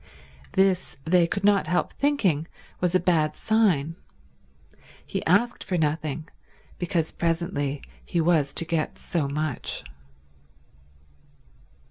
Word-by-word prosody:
This, 190 -2 +2
they 170 0 +4
could 200 +3 -3
not 200 -5 +4
help 175 +2 0
thinking, 195 - +1 0.3
was 180 0 +1
a - - +6
bad 165 -4 +2
sign. 185 -9 +2 1.1
He - - -3
asked 220 +8 +2
for 180 - -1
nothing 155 0 -1 0.5
because 175 -3 0
presently 165 -4 -1 0.2
he 175 - -2
was 160 -4 +3
to 165 - +2
get 165 -2 -1
so 165 -6 -2
much. 145 - -2
170 Hz, 110 wpm, -26 LUFS, 155-185 Hz, 1.1 s, a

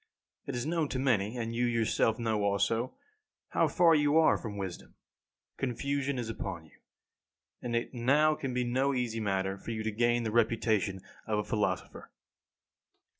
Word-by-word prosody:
It - - -3
is 120 - -2
known 160 -2 0
to - - -2
many, 120 -4 +1
and 115 -1 -3
you 120 +1 +1
yourself 115 -1 +1
know 110 -3 0
also, 100 +5 0 0.5
how - - +2
far 170 -2 +4
you 150 0 +3
are 160 - +5
from 105 -3 -6
wisdom. 95 -3 -6 0.6
Confusion 140 +2 -1
is 120 -2 -3
upon 95 -7 -5
you, 75 - -22 0.8
and 120 -1 -3
it 115 +3 -2
now 140 +6 +3
can 135 -3 -4
be 125 0 0
no 130 +3 +1
easy 120 -3 -1
matter 95 -2 -1
for - - -9
you 110 -1 -3
to 110 - -1
gain 120 +2 +2
the 110 - -2
reputation 110 -4 +1 0.3
of 110 -1 0
a 105 - 0
philosopher. 105 0 -2
115 Hz, 170 wpm, -30 LUFS, 105-130 Hz, 0.8 s, are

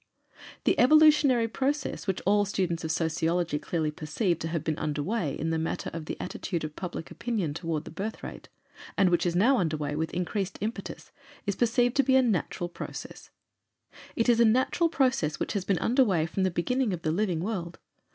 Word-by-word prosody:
The - - +2
evolutionary 295 -4 +6
process 270 +1 -2
which 190 - -1
all 205 +2 +4
students 180 -4 -1
of 160 - -1
sociology 165 0 0
clearly 155 -1 -1
perceive 165 +4 -1
to 165 - -3
have 165 -2 -2
been 155 -2 -2
underway 150 +2 -2
in 165 - -2
the 160 - 0
matter 160 - -3
of 165 -2 -5
the - - -5
attitude 170 -4 -4
of 155 -1 -5
public 175 -3 -6
opinion 210 -11 -2
toward 165 -1 -3
the - - -9
birth 200 +7 -5
rate, - - -8 0.5
and 190 -3 +4
which 175 0 +2
is 170 - -1
now 240 +8 +4
underway 155 -4 -1
with 160 +1 -2
increased 180 +2 -2
impetus, 220 +3 -5 0.3
is 200 -2 -1
perceived 240 +1 +2
to 275 - +5
be 265 0 +3
a 265 - +6
natural 195 -5 -1
process. 175 - -8 0.9
It 230 - +1
is 235 -1 +4
a - - +7
natural 260 +9 +3
process 255 - +1
which - - -2
has 200 -3 -2
been 195 -2 +1
underway 210 - +2
from 175 +4 -3
the 190 - +3
beginning 225 +6 0
of 170 - -5
the 155 - +1
living 180 -1 0
world. 180 -4 -4
180 Hz, 190 wpm, -28 LUFS, 160-230 Hz, 0.9 s, a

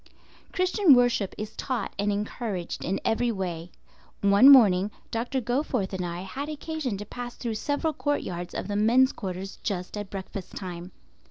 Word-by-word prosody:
Christian 370 -4 +5
worship 245 -5 +2
is 215 0 -6
taught 250 -6 -3
and 205 +1 +1
encouraged 205 -3 -3
in 190 +3 -1
every 235 +2 +1
way. 175 -4 -4 0.5
One 200 +6 +7
morning 205 -8 +7 0.2
Dr. 245 +4 -1
Goforth 245 -5 -1
and 185 -1 -2
I 175 0 -4
had 265 +11 -5
occasion 305 -6 -3
to 205 - -7
pass 245 +3 -7
through 235 -2 -3
several 290 +8 -1
courtyards 180 - -3
of - - -3
the 205 - -3
men's 240 +6 +4
quarters 190 -1 -6
just 185 -3 -3
at 205 -2 -5
breakfast 195 -1 -7
time. 180 -1 -6
210 Hz, 160 wpm, -27 LUFS, 190-255 Hz, 0.5 s, One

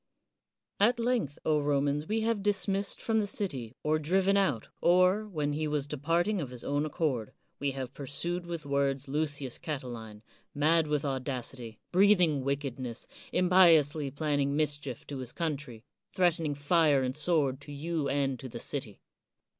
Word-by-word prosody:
At 235 +5 +4
length, 230 - 0
Romans, 145 -1 +1
we 220 +1 0
have 225 -2 0
dismissed 200 0 +1
from 225 -1 +1
the 205 - 0
city 135 - -3
or 155 +1 +2
driven 190 +5 +2
out 185 - +1
or, 185 +4 +4
when 150 -7 -2
he 155 +1 -1
was 150 -2 -1
departing 165 +7 0
of 140 - -4
his 125 -1 -7
own 145 +2 0
accord, 145 - -2 0.3
we 140 0 -1
have 130 -1 -5
pursued 170 +6 -4
with 170 -3 -5
words 140 -1 0
Lucius 145 -2 -2
Catiline, 120 -8 -6 0.3
mad 155 +2 +3
with 150 0 0
audacity, 130 -4 -4
breathing 180 -7 +4
wickedness, 135 -3 -3 0.3
impiously 165 -6 +4
planning 145 0 0
mischief 145 -4 -2
to 140 -2 -6
his 125 -2 -5
country, 145 -8 -4 0.3
threatening 165 -5 +1
fire 145 -1 +3
and 130 0 -2
sword 150 -4 +2
to 145 - -9
you 150 0 -2
and 135 -2 0
to 130 - -7
the - - -7
city. - - -5
150 Hz, 150 wpm, -30 LUFS, 135-175 Hz, 0.3 s, At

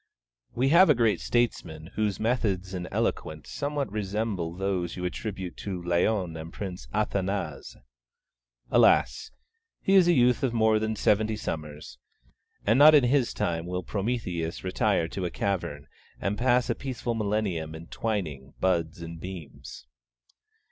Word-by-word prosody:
We 130 +3 +2
have 175 +4 +7
a 150 - +6
great 115 -3 +2
statesman 85 -9 -1
whose 105 -2 -1
methods 100 -5 0
and 90 -1 -4
eloquence 75 -1 -2
somewhat 145 -4 -2
resemble 100 -4 -2
those 95 -2 -2
you 90 - -4
attribute 95 -1 -5
to 95 -3 -4
Laon 90 +1 0
and 80 +1 -7
Prince 90 -11 -6
Athanase. 95 -5 -2 0.9
Alas! 65 0 +4 0.5
he 195 - +1
is 190 -3 +7
a 175 - +5
youth 125 -4 +4
of 130 -4 0
more 110 -1 +4
than 110 0 -1
seventy 110 +1 +2
summers; 75 -7 -6 0.7
and 115 +5 +4
not 155 +1 +9
in 145 - +6
his 125 0 +2
time 85 0 -2
will 90 0 -3
Prometheus 95 -6 -3
retire 90 -3 +1
to 95 - -4
a - - -1
cavern 85 -7 -3 0.3
and 100 +1 -1
pass 125 +1 +2
a 120 - +1
peaceful 125 -2 -4
millennium 100 -8 -1
in 80 +1 -9
twining 80 -11 -4
buds 85 -3 0
and 85 0 -8
beams. 90 -9 -9
100 Hz, 145 wpm, -27 LUFS, 85-115 Hz, 0.9 s, not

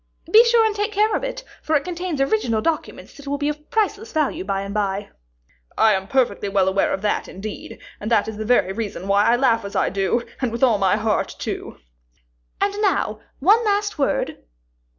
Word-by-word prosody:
"Be 445 +4 +9
sure 470 -1 +4
and 435 -1 0
take 415 +1 -1
care 430 +1 +2
of - - -2
it, - - -4 0.2
for 315 - 0
it 285 - +2
contains 355 -3 -4
original 230 -4 +1
documents 320 +6 -3
that 285 -1 -13
will 285 +1 -1
be 290 +1 -1
of 300 0 -7
priceless 435 0 -1
value 305 - 0
by 195 0 -2
and 200 0 -6
by." 200 -1 -2 0.7
"I 220 -1 +5
am 190 0 -2
perfectly 245 -5 0
well 195 -1 +2
aware 190 +1 +1
of 190 - -3
that 210 - 0
indeed, 205 +3 -8 0.2
and 210 - -4
that 225 -3 +2
is 220 -1 -5
the 215 - -3
very 215 -4 +2
reason 205 -3 -5
why 200 +1 +3
I 235 - +4
laugh 235 -3 +2
as 200 - -7
I - - +2
do, 195 +5 0 0.2
and 250 -3 0
with 235 +3 -3
all 230 -6 +4
my 195 +1 +3
heart, 215 0 -1
too." - - -5 0.8
"And 400 0 +1
now, 350 - +1 0.2
one 415 - +4
last 410 -4 0
word." 275 - 0
240 Hz, 210 wpm, -22 LUFS, -, 0.8 s, Be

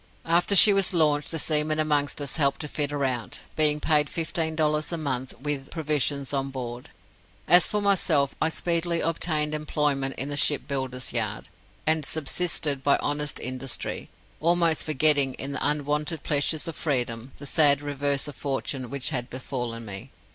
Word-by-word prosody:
After 175 +4 +2
she 205 +2 +10
was 195 -2 +1
launched, 150 -3 +2
the 165 - -3
seamen 155 0 +1
amongst 150 -2 0
us 140 - -2
helped 140 -3 +1
to 150 - -4
fit 145 -1 -2
her 145 -1 -2
out, 125 -3 -3
being 150 -1 +3
paid 150 -2 +2
fifteen 160 -1 -3
dollars 150 0 0
a 170 - -2
month, 130 -4 -4
with 140 -1 -3
provisions 145 -3 -1
on 135 0 -1
board. 125 -2 -7 0.6
As 175 0 +6
for 210 -1 -2
myself, 165 -8 +2
I 160 - +3
speedily 170 0 0
obtained 155 -2 -1
employment 145 -3 -1
in 135 - -2
the 145 - -3
shipbuilder's 130 -3 -1
yard, 110 -6 -3 0.4
and 155 0 +2
subsisted 155 -2 -1
by 140 - +4
honest 145 0 -2
industry, 130 +1 -4 0.3
almost 170 -1 +2
forgetting, 145 -3 +3
in 135 - -4
the - - -2
unwonted 150 +2 -1
pleasures 150 +2 0
of 165 - -5
freedom, 125 -4 -2
the 145 - -10
sad 145 -1 +4
reverse 145 0 0
of 145 - -8
fortune 135 -2 -3
which 140 +2 -2
had 125 -4 -3
befallen 120 -3 -5
me. 95 -2 -7
145 Hz, 165 wpm, -25 LUFS, 135-155 Hz, 0.6 s, she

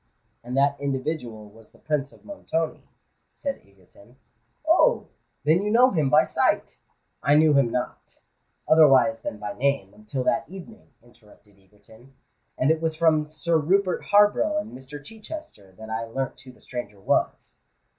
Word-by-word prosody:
"And 125 +2 -5
that 140 +1 +2
individual 130 -6 -4
was 110 0 -18
the - - -23
Prince 145 -3 -2
of - - -21
Montoni," 165 - -4 0.5
said 280 -1 -4
Egerton. 100 +4 -22 0.5
"Oh! - - +3 0.3
then 160 +5 +3
you 205 - -2
know 245 +4 +5
him 155 -6 +1
by 150 +2 +6
sight——" - - 0 0.5
"I 145 - +3
knew 155 0 +5
him 140 -4 +3
not, 125 +1 -5 0.5
otherwise 140 -5 +5
than 110 - -5
by 105 -1 -6
name, 135 -7 -1
until 105 +5 -5
that 135 +2 0
evening," 195 +4 -12
interrupted 105 -4 -23
Egerton; 110 +7 -21 0.4
"and 135 +4 +3
it 160 0 0
was 160 -1 -1
from 155 -2 +2
Sir 160 +1 0
Rupert 185 +4 +1
Harborough 205 +10 +3
and 305 - -5
Mr. 135 +3 -10
Chichester 215 - -10
that 110 0 -10
I 115 +1 -2
learnt 130 +3 -5
who 130 -1 -13
the - - -23
stranger 105 -5 -7
was." 95 - -1
140 Hz, 155 wpm, -24 LUFS, 115-160 Hz, 0.5 s, by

